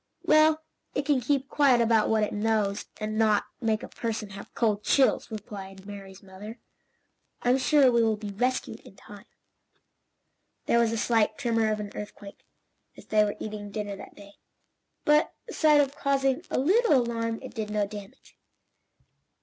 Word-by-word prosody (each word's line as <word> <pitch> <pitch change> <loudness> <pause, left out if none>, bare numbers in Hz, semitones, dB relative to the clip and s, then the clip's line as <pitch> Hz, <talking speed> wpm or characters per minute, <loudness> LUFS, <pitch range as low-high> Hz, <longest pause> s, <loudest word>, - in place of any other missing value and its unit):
"Well 310 +1 +4 0.3
it 280 - -1
can 280 -3 +2
keep 270 +2 0
quiet 275 -5 +3
about 225 -2 +3
what 220 -1 +2
it 210 - -2
knows, 210 -1 0
and 215 0 -3
not 215 -2 +3 0.2
make 220 -2 0
a - - -6
person 220 -3 -4
have 200 +1 -10
cold 210 -3 +1
chills," 270 -2 +2
replied 195 -3 -9
Mary's 195 -1 -10
mother. 200 +4 -10 0.9
"I'm 250 +2 +3
sure 275 -1 +4
we 235 -1 +3
will 220 -2 +2
be 210 -1 -6
rescued 250 +6 -2
in - - -16
time." 205 +2 -14 1.4
There 235 - +3
was 230 -1 +2
a 230 - -2
slight 225 -1 +1
tremor 225 -4 +1
of 215 - -2
an 205 -1 -6
earthquake, 205 -1 -10 0.5
as - - -13
they 215 -1 +3
were 205 -1 -2
eating 210 -1 -6
dinner 205 -1 -4
that - - -12
day, 200 0 -14 0.7
but, 300 +1 +3
aside 305 -2 +4
from 275 -1 0
causing 270 -2 0
a - - -1
little 405 - +3
alarm 230 -2 0
it 260 - -9
did 220 -3 -4
no 210 -1 0
damage. 200 -1 -11
220 Hz, 165 wpm, -27 LUFS, 205-255 Hz, 1.4 s, Well